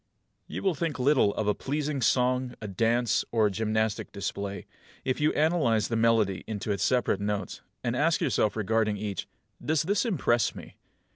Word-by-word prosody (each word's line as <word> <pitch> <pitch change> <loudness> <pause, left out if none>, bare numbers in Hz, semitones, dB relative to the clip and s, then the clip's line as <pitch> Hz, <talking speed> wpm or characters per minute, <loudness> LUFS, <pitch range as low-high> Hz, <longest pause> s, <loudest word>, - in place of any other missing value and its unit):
2. - - -9
You - - -4
will 190 -2 +2
think 165 0 -2
little 130 -5 +3
of 110 - -1
a 105 - +3
pleasing 145 +2 -2
song, 125 +1 +1
a 105 - -6
dance, 115 +4 +1
or 115 -2 +3
a 105 - +2
gymnastic 110 +1 -1
display, 100 0 -4 0.4
if 130 +2 -1
you 150 - +4
analyse 145 - +2
the 115 - -1
melody 110 -5 +2
into 105 -1 -3
its 100 -2 -2
separate 125 -5 +1
notes, 100 -2 -3 0.2
and - - -1
ask - - +2
yourself 105 - +1
regarding 110 0 +1
each, 100 -2 -4 0.4
"Does 155 0 +1
this 195 +4 +1
impress 135 - +1
me?" - - -11
115 Hz, 180 wpm, -28 LUFS, 105-135 Hz, 0.4 s, you